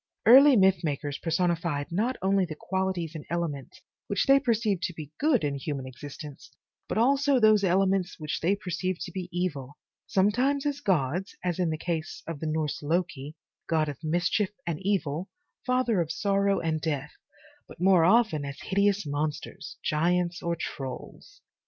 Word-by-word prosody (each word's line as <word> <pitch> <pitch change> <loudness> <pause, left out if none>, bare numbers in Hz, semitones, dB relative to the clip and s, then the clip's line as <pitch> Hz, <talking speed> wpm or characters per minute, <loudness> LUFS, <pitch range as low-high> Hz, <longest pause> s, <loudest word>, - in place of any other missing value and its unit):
Early 270 +4 +8
myth 190 -3 +4
makers 145 -2 -3
personified 165 -3 -1
not 225 +9 0
only 195 0 +3
the 165 -4 -4
qualities 190 -3 -2
and 155 -3 -7
elements 165 -6 -4 0.3
which 200 - 0
they 275 0 +6
perceived 220 -8 0
to 175 - -5
be 150 -3 -8
good 285 - +3
in 145 -1 0
human 140 -1 -4
existence, 140 +3 -10 0.4
but - - -3
also 275 +3 +3
those 215 -2 +5
elements 190 0 +2
which 155 +1 -3
they 185 +5 +2
perceived 185 -1 -3
to - - -5
be 185 -2 -5
evil, 150 -6 -3 0.3
sometimes 250 +9 +2
as 285 -1 -1
gods, 180 +1 0
as 180 -1 -1
in 175 -2 +1
the 155 - -2
case 165 -1 -4
of 165 -3 -6
the 160 - -3
Norse 155 -1 -2
Loki, 155 -2 -2 0.3
god 155 -2 +2
of 145 +2 -8
mischief 175 +5 +1 0.2
and 165 -3 -2
evil, 185 -3 -1 0.4
father 250 -6 +2
of 165 -1 -3
sorrow 200 +1 +1
and 160 -1 -1
death, 150 -2 -2 0.6
but - - -14
more 180 -2 +5
often 195 -5 +3
as 140 0 -6
hideous 200 0 +1
monsters, 145 +1 -4
giants 175 +3 0
or 170 0 -1
trolls. 140 - -7
175 Hz, 165 wpm, -27 LUFS, 155-200 Hz, 0.6 s, Early